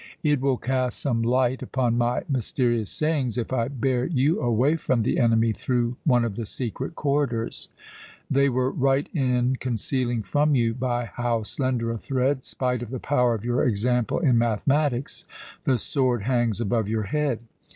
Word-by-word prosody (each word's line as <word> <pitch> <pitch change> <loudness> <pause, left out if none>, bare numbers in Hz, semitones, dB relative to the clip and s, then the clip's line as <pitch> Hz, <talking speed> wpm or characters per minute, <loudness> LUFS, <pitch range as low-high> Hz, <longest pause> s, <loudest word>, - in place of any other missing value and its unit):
It 150 -4 +2
will 135 -2 +1
cast 130 0 -1
some 120 -5 0
light 125 +2 +1
upon 125 -3 0
my 120 +1 +1
mysterious 120 -4 0
sayings 145 -7 -1
if 120 +1 -2
I 115 -2 +1
bear 130 -2 0
you 150 0 +1
away 120 +6 +2
from 130 -7 0
the 115 - 0
enemy 115 -2 +3
through 120 +1 -1
one 125 -5 +4
of 110 -4 -3
the 115 -1 -4
secret 130 +7 -4
corridors. 140 -6 -1 0.6
They 140 +1 +3
were 130 +1 0
right 135 +1 +1
in 125 -3 +1
concealing 120 -1 -2
from 145 +5 +2
you 115 -3 +2
by 120 -1 -1
how 120 -1 -2
slender 125 0 -1
a 115 - -4
thread, 130 +1 0
spite 125 -2 -2
of 120 - -6
the 130 0 -4
power 125 -4 +2
of 110 +1 -7
your 120 0 +1
example 120 +1 +1
in 130 -9 +3
mathematics, 130 +4 0 0.4
the 130 - +3
sword 125 -1 0
hangs 120 -3 +1
above 115 -1 0
your 110 0 -1
head. 135 +2 -1
125 Hz, 170 wpm, -25 LUFS, 115-135 Hz, 0.6 s, one